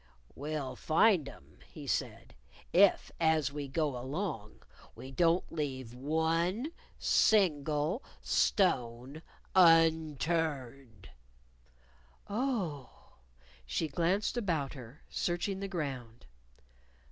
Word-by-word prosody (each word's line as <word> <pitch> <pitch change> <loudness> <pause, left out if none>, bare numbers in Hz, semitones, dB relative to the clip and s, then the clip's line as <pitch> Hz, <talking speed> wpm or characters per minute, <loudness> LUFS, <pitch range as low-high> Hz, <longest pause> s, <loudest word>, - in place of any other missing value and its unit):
"We'll 145 -2 -4
find 160 -2 +3
'em," 70 - -17
he - - -9
said, - - -3 0.4
"if, - - +4
as 160 -3 +2
we 145 -1 -4
go 145 0 -1
along, 130 - -5 0.3
we 130 - -9
don't 170 +5 +2
leave 130 -6 -4
one 165 - 0 0.3
single 155 - +2 0.2
stone 130 - 0 0.3
unturned." 160 - +2 1.2
"Oh!" 200 - -4 0.5
she 65 - -2
glanced 175 - 0
about 165 - -1
her, 130 +1 -12
searching 180 +3 -2
the 195 - -3
ground. 135 -10 -5
155 Hz, 90 wpm, -32 LUFS, 135-175 Hz, 1.2 s, if